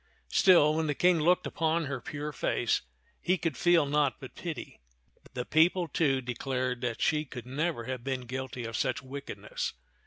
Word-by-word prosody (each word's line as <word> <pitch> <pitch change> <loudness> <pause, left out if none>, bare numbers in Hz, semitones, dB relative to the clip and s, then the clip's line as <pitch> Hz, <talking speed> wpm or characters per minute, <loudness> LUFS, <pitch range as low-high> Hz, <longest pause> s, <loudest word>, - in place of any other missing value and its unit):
Still, 170 -6 +6
when 160 0 0
the 145 - 0
King 175 +1 +4
looked 180 +4 +3
upon 165 0 0
her 135 -3 -4
pure 150 +1 -5
face, - - 0 0.4
he 185 +1 +2
could 165 -5 -2
feel 175 +2 +4
naught 145 -1 +2
but 130 - -10
pity. 165 -3 -6 0.6
The 125 -1 -2
people, 170 +3 +3
too, 140 -4 +1
declared 125 0 -2
that 120 -2 -2
she 150 -1 +2
could 125 -5 -9
never 145 +1 -2
have 130 0 -5
been 130 -1 -2
guilty 130 0 -5
of 115 0 -5
such - - -1
wickedness. 140 +2 -5
145 Hz, 175 wpm, -30 LUFS, 130-165 Hz, 0.6 s, Still